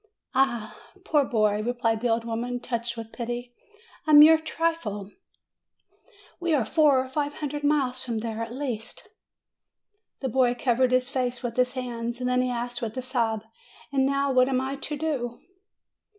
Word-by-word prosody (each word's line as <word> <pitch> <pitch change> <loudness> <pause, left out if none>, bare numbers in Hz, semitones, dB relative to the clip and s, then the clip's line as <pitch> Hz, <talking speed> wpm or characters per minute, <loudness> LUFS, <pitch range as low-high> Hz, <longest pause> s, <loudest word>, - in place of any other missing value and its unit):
"Eh, 240 -5 +1 0.3
poor 295 -2 +3
boy," 215 -4 +1
replied 230 -1 0
the 245 - +1
old 230 0 +1
woman, 240 +2 -3
touched 235 -1 -3
with 225 -1 -7
pity; 240 0 -5 0.5
"a 305 - +6
mere 310 +2 +9
trifle! 315 -12 -2 1.3
We 345 -3 +1
are 255 -6 +1
four 295 +2 +4
or - - -9
five 290 +2 -2
hundred 295 0 -4
miles 265 -4 +1
from 230 -3 -3
there, 225 -1 -4
at 230 0 -4
least." 250 - -5 1.1
The 265 - -2
boy 245 0 +2
covered 250 +1 +2
his 255 +1 +2
face 250 -2 -2
with 235 -2 -3
his 250 0 +2
hands; 240 -2 -4
then 250 0 +1
he 255 - 0
asked 245 0 -3
with 225 +1 -4
a - - -1
sob, 230 -4 -1 0.5
"And 270 -1 +3
now 275 +1 +1
what 255 0 +4
am 260 -1 +1
I 265 +1 -2
to 295 +2 -4
do 270 -6 -2
250 Hz, 165 wpm, -26 LUFS, 235-275 Hz, 1.3 s, mere